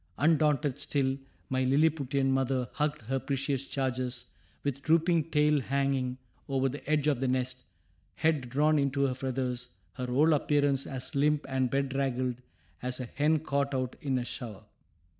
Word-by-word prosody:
Undaunted 150 -2 +2
still, 135 -2 0 0.3
my 130 0 0
Lilliputian 140 -1 +2
mother 130 -1 +1
hugged 150 -3 -1
her 135 +4 -1
precious 135 0 -2
charges, 130 -2 -2 0.4
with 140 -1 -2
drooping 165 +1 +3
tail 150 -1 +3
hanging 135 -1 0 0.3
over 135 0 +2
the 140 +2 -5
edge 150 -2 +2
of 145 -5 +2
the 135 - 0
nest, 130 0 -1 0.5
head 155 -6 +1
drawn 150 +4 +3
into 140 0 +1
her 130 - +1
feathers, 125 -1 -3 0.2
her 125 +4 -4
whole 145 +6 +4
appearance 145 -2 +2
as 130 -2 -5
limp 150 +1 +2
and 130 -2 0
bedraggled 130 -2 -1 0.4
as 125 +1 -3
a 125 - -3
hen 150 +6 +2
caught 140 -2 0
out 130 -1 -2
in 135 -4 0
a 125 - -2
shower. 115 -5 -7
135 Hz, 155 wpm, -30 LUFS, 130-145 Hz, 0.5 s, whole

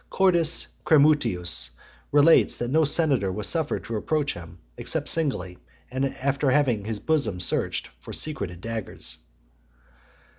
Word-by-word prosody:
Cordus 175 -4 +3 0.2
Cremutius 90 - +3 0.4
relates 145 +3 +4
that 120 +1 -4
no 160 +2 +3
senator 140 - +2
was 105 +2 -2
suffered 160 -3 0
to 115 - -4
approach 150 +5 -1
him, 85 0 -11 0.2
except - - -2
singly, 115 - -1 0.3
and 130 +1 -2
after 140 +1 -1
having 130 -7 +1
his 110 -1 -3
bosom 140 - -1
searched 90 - -1
[for - - -11
secreted 90 - -6
daggers]. 110 - -4
130 Hz, 125 wpm, -24 LUFS, 95-155 Hz, 0.4 s, relates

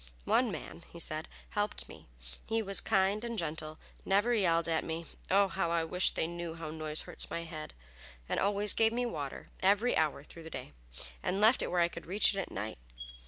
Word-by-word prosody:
"One - - +3
man," 80 +7 -7
he 170 - -10
said, 155 0 -1 0.2
"helped 205 0 -2
me. - - -13 0.4
He 225 0 +1
was 195 -1 0
kind 200 +1 +2
and 235 -1 -3
gentle; 155 -2 -3 0.3
never 205 +5 +3
yelled 170 -6 +3
at 165 -1 +1
me 165 +1 -4 0.2
(oh, 200 +1 +5
how 170 -1 -1
I 170 -1 +2
wish 180 +3 +2
they - - 0
knew 170 0 -5
how 165 -2 -6
noise 155 -1 -1
hurts - - -4
my 170 - -3
head!) 155 - -7 0.5
and - - 0
always 205 +1 +3
gave 225 0 +3
me 245 +1 0
water 145 - -5
every 205 +6 +3
hour 150 -3 +1
through 165 - -12
the 160 - -9
day, - - -7 0.5
and 190 - -1
left 220 +4 +6
it - - -1
where 180 - +2
I 170 - +5
could 170 -1 -9
reach 200 +4 +5
it 195 - -2
at 190 - -3
night. 105 - -5
170 Hz, 210 wpm, -32 LUFS, 160-205 Hz, 0.5 s, left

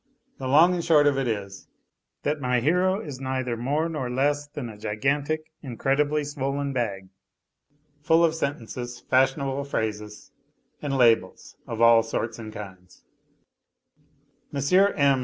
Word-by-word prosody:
The 130 - -4
long 160 +7 +6
and 175 -1 -2
short 155 -3 +4
of 140 -2 +3
it 135 - -1
is, 100 -3 -5 0.6
that 150 0 -1
my 125 -1 +1
hero 180 - +1
i - - -7
neither 130 -2 -2
more 145 +7 -1
nor 150 -7 -4
less 145 +3 0
than 145 -3 -6
a 110 - -9
gigantic, 140 +10 -2
incredibly 145 +3 0
swollen 140 -1 -3
bag, 100 -7 -3 0.9
fu] 160 +3 +4
of 165 -1 +3
sentences, 125 -5 -4
fashionable 135 +1 +1
phrases, 105 -5 -4 0.5
and 140 -2 -2
labels 115 -3 +2
of 115 0 -4
all 115 -1 +7
sorts 115 +1 -4
and 110 -1 -7
kinds 95 -4 -11 1.5
M. 140 - -3 0.4
M. 140 -2 +4
135 Hz, 140 wpm, -25 LUFS, 115-145 Hz, 1.5 s, all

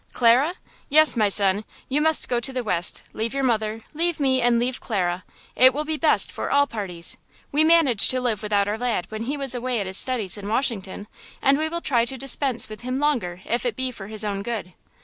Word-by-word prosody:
"Clara? 255 +8 +3 0.3
Yes, 310 +1 +5
my 215 -3 +2
son, 200 +1 +4 0.2
you 285 +3 0
must 315 0 +3
go 245 - 0
to 240 +3 -1
the 255 -1 -3
West, 180 -5 +1
leave 225 +3 -4
your 275 - -1
mother, 220 -3 -1
leave 335 +1 -1
me 260 -2 +1
and 240 -1 +3
leave 245 +2 -2
Clara! 180 -5 -2 0.3
It 255 +1 +6
will 300 +1 -2
be 315 0 -1
best 310 0 +2
for - - -5
all 285 0 +3
parties! 190 -9 -6 0.3
We 300 +2 +3
managed 315 -9 +4
to 255 - +3
live 235 -5 -1
without 205 -2 0
our 210 +2 -3
lad, 240 -7 -1
when 220 +1 -5
he 285 +4 -3
was 275 -3 +1
away 245 -1 -2
at 200 - -3
his 190 +1 -1
studies 220 -7 +1
in 200 - -8
Washington, 215 -5 -2 0.3
and 275 +1 +3
we 315 0 -1
will 340 +1 -4
try 240 -7 +1
to 265 +2 -4
dispense 270 -1 +1
with 215 -1 -10
him 255 +1 -3
longer 235 -12 -1
if 235 - -2
it 245 -4 -2
be 260 +1 -2
for 200 -5 -10
his 215 0 -3
own 200 -2 -3
good." 205 -4 -5
240 Hz, 225 wpm, -23 LUFS, 210-275 Hz, 0.3 s, It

